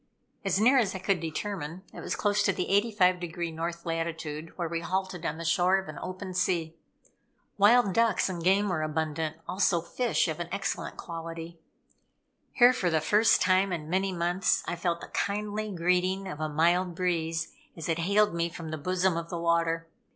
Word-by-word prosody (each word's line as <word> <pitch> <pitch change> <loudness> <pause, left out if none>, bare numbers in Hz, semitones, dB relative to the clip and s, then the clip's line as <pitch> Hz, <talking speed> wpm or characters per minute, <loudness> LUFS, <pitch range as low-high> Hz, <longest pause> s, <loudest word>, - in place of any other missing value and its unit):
As 195 -1 +1
near 255 +5 +5
as 200 -5 0
I - - -1
could 190 0 0
determine, 170 +1 -4
it - - -9
was - - -3
close 205 -1 +1
to 200 - +3
the 180 - -2 0.3
85° 175 -3 +1
north 170 +1 -4
latitude, 165 -1 -4
where 170 -2 -1
we 165 0 -2
halted 185 0 -2
on 150 - -3
the 165 - -6
shore 180 +3 +3
of 190 - -4
an 155 - -7
open 185 0 -6
sea. 170 -3 0 0.9
Wild 205 0 +5
ducks 230 -2 +3
and 175 -3 -4
game 195 +3 +3
were 175 -4 -1
abundant, 155 0 -2
also 185 -2 +2
fish 235 +5 0
of 160 0 -3
an 170 -1 -4
excellent 195 +1 -3
quality. 165 0 -7 0.9
Here, 245 +1 +6
for 185 -8 0
the 160 -1 +2
first 210 +8 +4
time 185 +1 +3
in 160 -2 -4
many 190 +1 +1
months, 175 +1 +1
I 170 - -1
felt 170 0 -1
the - - -8
kindly 210 +1 -2
greeting 180 +2 +1
of 155 -5 -6
a 155 0 -2
mild 170 +3 +2
breeze 165 -3 -1 0.2
as 165 - -5
it 165 0 0
hailed 200 +4 +3
me 170 0 0
from 165 -2 -7
the 155 - -4
bosom 185 +3 +1
of 170 0 -4
the 175 - -3
water. 165 0 +1
175 Hz, 190 wpm, -28 LUFS, 165-190 Hz, 0.9 s, Here